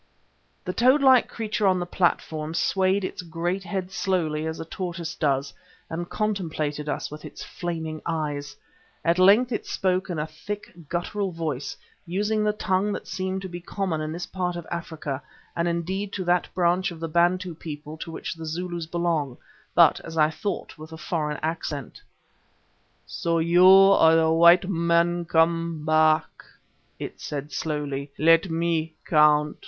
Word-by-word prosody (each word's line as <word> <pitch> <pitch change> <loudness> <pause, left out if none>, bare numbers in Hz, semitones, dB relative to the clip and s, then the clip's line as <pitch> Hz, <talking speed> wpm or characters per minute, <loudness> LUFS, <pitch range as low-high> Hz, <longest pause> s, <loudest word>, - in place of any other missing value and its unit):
The 180 - -2
toad 260 +6 +4
like 260 -2 +6
creature 215 -2 -1
on 185 -1 +3
the 175 - -2
platform 160 -3 -1
swayed 190 +2 +1
its 185 - -4
great 175 +2 -3
head 190 -1 -4
slowly 165 -6 -1
as 160 - -4
a 165 - -5
tortoise 170 -1 -5
does, 140 -2 0 0.4
and 175 +2 -4
contemplated 160 -8 -2
us - - -3
with 150 0 -9
its - - -9
flaming 160 -3 -5
eyes. 145 -3 -3 0.5
At 170 +2 +2
length 210 +7 +6
it 220 - -3
spoke 185 0 0
in 175 - -3
a 150 - -1
thick, 180 +7 -7 0.2
guttural 190 +3 -2
voice, 155 -5 -4 0.3
using 210 +5 -1
the 210 - +2
tongue 200 -1 0
that - - -5
seemed 190 0 -3
to - - -4
be 175 -1 -7
common 180 -2 -2
to 155 - -3
this 170 +2 -4
part 180 -2 -3
of 170 -1 -6
Africa 160 -5 -4 0.3
and 170 0 0
indeed 185 +4 -2
to 190 - -3
that 175 0 +1
branch 180 +1 +2
of 170 -3 -9
the 165 - -3
Bantu 175 +2 +1
people 150 -1 -8
to 165 - -7
which 165 - -5
the 165 -1 -8
Zulus 175 0 -4
belong, 165 -6 -1 0.4
but, - - +6
as 165 0 -8
I 155 0 +4
thought, 200 -2 -5
with 155 +1 -10
a 160 - -8
foreign 150 -2 -2
accent. 155 -4 -4 1.0
"So 170 0 -1
you 170 +3 +5
are 190 -4 +7
the 160 0 +3
white 170 +2 +6
men 170 -1 +1
come 165 -1 +1
back," 155 0 +2 0.5
it - - -7
said 145 0 -5
slowly. 145 -3 -3
"Let 165 +4 +4
me 165 -1 -1
count!" 150 -1 +4
170 Hz, 165 wpm, -25 LUFS, 155-185 Hz, 1.0 s, are